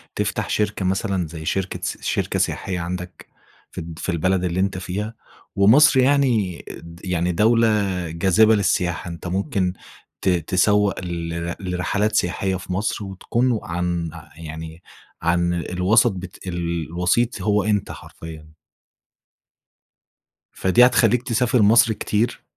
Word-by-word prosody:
تفتح - - -2
شركة 105 -2 -1
مثلًا 95 -2 -1
زي 80 0 -8
شركة 95 +2 -2
سي - - -3
شركة - - -1
سياحية 90 -2 -1
عندك، 90 +1 -6 0.4
في - - -20
الد 80 0 -9
في - - -4
البلد 90 +2 0
اللي 90 0 -1
أنت 95 0 0
فيها، 105 +5 -4 0.4
ومصر 130 +8 +6
يعني 125 -9 +2
د 85 0 -11
يعني 90 -1 0
دولة 115 +6 +3 0.4
جاذبة 95 +7 +4
للسياحة، 90 -4 0
أنت 85 +1 -7
ممكن 95 - -1 0.5
ت - - +1
تسوّق 95 +4 +2
لر 85 -1 -4
لرحلات 100 +3 -1
سياحية 95 0 0
في 95 0 -5
مصر، 100 +2 -2
وتكون 115 +5 -1
عن 85 -1 -2 0.3
يعني 80 +1 -9 0.4
عن 85 0 +1
الوسط 90 +7 +2
بت 95 0 -9
الوسيط 85 +5 -1
هو 105 -1 +2
أنت 105 -1 0
حرفيًا. 80 -1 -11 2.0
فدي 115 +7 +4
هتخليك 120 -1 +3
تسافر 120 0 +1
مصر 110 +2 +5
كتير 110 +2 -1
95 Hz, 125 wpm, -22 LUFS, 85-105 Hz, 2.0 s, ومصر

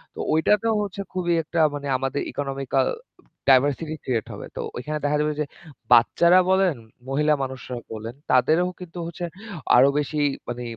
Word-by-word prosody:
তো - - -10
ঐটাতেও 210 +7 +2
হচ্ছে 200 0 -5
খুবই 175 -2 0
একটা 165 +1 -3
মানে 145 -1 -5
আমাদের 135 +2 -2
ইকোনমিক্যাল 135 -1 -1 0.6
ডাইভার্সিটি 145 +4 +3
ক্রিয়েট 120 -4 -1
হবে। - - -8
তো - - -2 0.2
ওখানে 150 +5 -3
দেখা 150 +1 +2
যাবে 150 0 0
যে 150 - +1 0.5
বাচ্চারা 170 +9 +5
বলেন, 190 -4 +3 0.3
মহিলা 150 +2 +2
মানুষরা 130 -1 -6 0.2
বলেন 110 +3 -7 0.2
তাদেরও 160 +8 +3
কিন্তু 175 -1 -10
হচ্ছে 170 +1 -5 0.5
আরো 130 +3 +7
বেশি 150 +1 -2 0.3
মানে 120 0 -4
150 Hz, 150 wpm, -24 LUFS, 130-170 Hz, 0.6 s, আরো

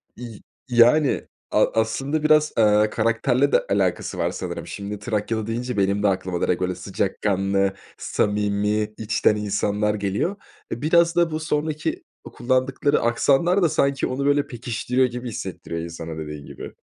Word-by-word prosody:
Y 115 -3 -9 0.3
yani, 125 +5 +4 0.2
a - - +4
aslında, 135 +7 -1
biraz, 155 0 +4
eee, 105 -1 +4
karakterle 115 +5 +1
de - - +3
alakası 95 -2 0
var - - 0
sanırım. - - -6
Şimdi, 100 0 -6
"Trakyalı" 110 +1 -2
deyince, 120 +1 -3
benim 100 +1 +1
de - - +4
aklıma 95 -2 -1
direkt 90 - 0
öyle 90 0 -1
sıcakkanlı, 95 +1 0 0.2
samimi, 105 +1 0
içten 110 -1 +1
insanlar 105 0 0
geliyor. 100 - -1 0.4
Biraz 170 +7 +2
da 170 -2 +3
bu 155 - -2
sonraki 155 0 -2 0.3
kullandıkları 130 +3 +1
aksanlar 140 +10 +2
da 170 - +4
sanki 140 -1 +1
onu 135 +2 -2
böyle 145 0 +2
pekiştiriyor 125 +1 -1
gibi 125 0 -6
hissettiriyor 90 -5 -5
insana, 85 -1 -7
dediğin 75 -2 -7
gibi. - - -9
110 Hz, 140 wpm, -23 LUFS, 100-140 Hz, 0.4 s, yani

